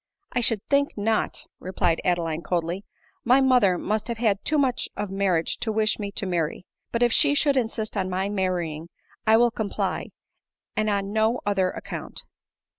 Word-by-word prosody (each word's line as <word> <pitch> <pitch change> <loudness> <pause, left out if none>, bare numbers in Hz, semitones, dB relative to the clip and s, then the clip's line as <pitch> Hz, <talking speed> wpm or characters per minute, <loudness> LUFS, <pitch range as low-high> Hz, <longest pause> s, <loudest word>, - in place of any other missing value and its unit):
" 400 - -49
I - - +1
should 225 -3 +3
think," 280 0 +2 0.6
replied 180 -2 0
Adeline 170 -3 0
coldly, 175 +2 -2 0.2
" - - -33 0.2
my 250 +3 +5
mother 250 -9 +4
must 215 +3 -2
have 235 -1 -3
had 215 -4 +1
too 305 - +1
much 265 -4 +1
of 205 -1 -3
marriage 190 -4 0
tp 220 -2 -2
wish 215 0 +2
me 200 -1 -4
to 200 - -2
mar 175 -4 +1
ry; 165 - -10 0.3
but 235 +1 +1
if 240 -1 +3
she 285 - +4
should 285 -1 +3
insist 225 -4 -1
on 190 -2 -1
my 190 +1 -1
marrying, 175 -5 -2 0.4
I 220 0 +7
will 240 0 +4
com 220 -3 -3
ply, - - -2 0.7
and 215 0 +1
on 200 0 -1
no 220 +3 +2
other 195 -2 +2
account." - - -6
205 Hz, 190 wpm, -25 LUFS, 185-235 Hz, 0.7 s, I